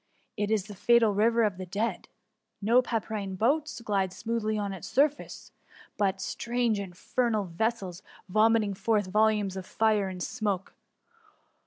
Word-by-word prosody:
It 210 Hz, -1 st, -1 dB
is 215 Hz, -3 st, +1 dB
the 205 Hz, +1 st, -10 dB
fatal 230 Hz, +2 st, +4 dB
river 230 Hz, +3 st, +3 dB
of 205 Hz, -4 st, 0 dB
the 185 Hz, -, -4 dB
dead. 210 Hz, +6 st, -2 dB, 0.5 s
No 230 Hz, +5 st, +4 dB
pdpyrine 215 Hz, -5 st, -3 dB
boats 280 Hz, +5 st, 0 dB
glide 195 Hz, -4 st, 0 dB
smoothly 215 Hz, +1 st, -2 dB
on 200 Hz, -2 st, -2 dB
its 185 Hz, -, -8 dB
surface; 290 Hz, +2 st, 0 dB, 0.4 s
but 195 Hz, -2 st, 0 dB
strange, 235 Hz, 0 st, -1 dB
in 195 Hz, -3 st, -6 dB
fernal 220 Hz, +2 st, 0 dB
vessels, 190 Hz, 0 st, -2 dB, 0.3 s
vomiting 215 Hz, +1 st, +3 dB
forth 210 Hz, +1 st, +1 dB
volumes 210 Hz, 0 st, +2 dB
of 190 Hz, -1 st, -6 dB
fire 215 Hz, -3 st, +2 dB
and 180 Hz, -1 st, -5 dB
smoke. 205 Hz, -5 st, -2 dB
215 Hz, 145 wpm, -28 LUFS, 195-230 Hz, 0.5 s, fatal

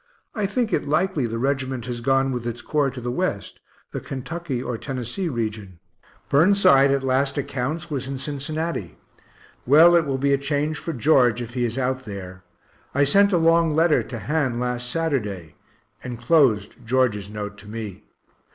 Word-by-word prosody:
I 210 Hz, -3 st, -1 dB
think 225 Hz, -1 st, -1 dB
it -, -, 0 dB
likely 155 Hz, -4 st, +1 dB
the 115 Hz, 0 st, -4 dB
regiment 130 Hz, -1 st, -1 dB
has 120 Hz, -1 st, -5 dB
gone 135 Hz, +2 st, +2 dB
with 120 Hz, -2 st, -3 dB
its 120 Hz, 0 st, -5 dB
corps 145 Hz, -2 st, +1 dB
to 130 Hz, 0 st, -8 dB
the 120 Hz, 0 st, -3 dB
West, -, -, -3 dB, 0.3 s
the -, -, -4 dB
Kentucky 140 Hz, +1 st, -5 dB
or 125 Hz, -1 st, -3 dB
Tennessee 130 Hz, -, -4 dB
region 110 Hz, -, -4 dB, 0.5 s
Burnside 145 Hz, -4 st, +5 dB
at 135 Hz, 0 st, +1 dB
last 135 Hz, +2 st, +1 dB
accounts 145 Hz, +5 st, -3 dB
was 130 Hz, -3 st, -3 dB
in 135 Hz, 0 st, -4 dB
Cincinnati. 145 Hz, -, -4 dB, 0.7 s
Well, 160 Hz, +6 st, +7 dB
it 165 Hz, -3 st, +3 dB
will 135 Hz, -1 st, -1 dB
be 140 Hz, +1 st, +2 dB
a 140 Hz, -, +2 dB
change 145 Hz, +2 st, -1 dB
for 165 Hz, -, -4 dB
George, 125 Hz, -4 st, +3 dB
if 120 Hz, -1 st, -6 dB
he 125 Hz, -1 st, 0 dB
is 115 Hz, +1 st, -3 dB
out 130 Hz, 0 st, -1 dB
there. 95 Hz, -3 st, -8 dB, 0.5 s
I 140 Hz, -, +4 dB
sent 200 Hz, +8 st, +4 dB
a 180 Hz, -, +3 dB
long 165 Hz, -1 st, +3 dB
letter 160 Hz, 0 st, +4 dB
to 120 Hz, -, -7 dB
Han 135 Hz, -1 st, -1 dB
last 125 Hz, 0 st, -2 dB
Saturday 105 Hz, -, -2 dB, 0.5 s
enclosed 120 Hz, -3 st, +2 dB
George's 115 Hz, -4 st, 0 dB
note 105 Hz, -1 st, -6 dB
to 100 Hz, -, -14 dB
me. 105 Hz, -2 st, -7 dB
130 Hz, 170 wpm, -23 LUFS, 120-150 Hz, 0.7 s, Well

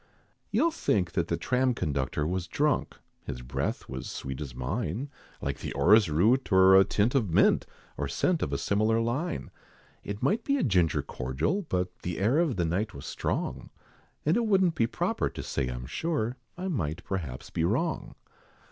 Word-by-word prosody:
You'll 335 Hz, -, +2 dB
think 95 Hz, -, 0 dB
the 85 Hz, -1 st, 0 dB
tram 130 Hz, -1 st, +1 dB
conductor 75 Hz, -, -1 dB
was 90 Hz, +2 st, -2 dB
drunk, 145 Hz, -, 0 dB, 0.3 s
His 60 Hz, -1 st, -5 dB
breath 65 Hz, +2 st, -3 dB
was 65 Hz, -1 st, -6 dB
sweet 65 Hz, +2 st, -5 dB
as 65 Hz, -5 st, -6 dB
mine, 100 Hz, -, -3 dB, 0.3 s
Like -, -, -3 dB
the -, -, -5 dB
orris 100 Hz, +7 st, +5 dB
root, 110 Hz, -, +2 dB
or 95 Hz, 0 st, +7 dB
a 95 Hz, -, +8 dB
tint 105 Hz, +5 st, +1 dB
of 120 Hz, -8 st, +2 dB
mint, -, -, +4 dB, 0.3 s
Or 70 Hz, -, -1 dB
scent 165 Hz, -, +1 dB
of -, -, -1 dB
a -, -, 0 dB
similar 110 Hz, +2 st, +2 dB
line. 130 Hz, +10 st, -2 dB, 0.5 s
It 100 Hz, +1 st, -5 dB
might 215 Hz, -, +2 dB
be 280 Hz, 0 st, +1 dB
a -, -, 0 dB
ginger 90 Hz, -, +2 dB
cordial; 65 Hz, -, -1 dB
but 90 Hz, 0 st, -2 dB
The 90 Hz, -1 st, -4 dB
air 115 Hz, +10 st, +3 dB
of 165 Hz, -7 st, +2 dB
the 90 Hz, -2 st, 0 dB
night 95 Hz, +6 st, -1 dB
was 70 Hz, -, -8 dB
strong, -, -, -3 dB, 0.6 s
And 155 Hz, -, +3 dB
it 235 Hz, -1 st, +1 dB
wouldn't 190 Hz, -4 st, +4 dB
be 115 Hz, -8 st, +1 dB
proper -, -, -1 dB
to -, -, -7 dB
say 70 Hz, -3 st, -2 dB
I'm 60 Hz, 0 st, -5 dB
sure, 125 Hz, -, -2 dB, 0.2 s
I 185 Hz, +1 st, -3 dB
might 85 Hz, -, -2 dB
perhaps 80 Hz, -10 st, -5 dB
be 80 Hz, -, -1 dB
wrong. 130 Hz, -, -1 dB
95 Hz, 180 wpm, -28 LUFS, -, 0.6 s, a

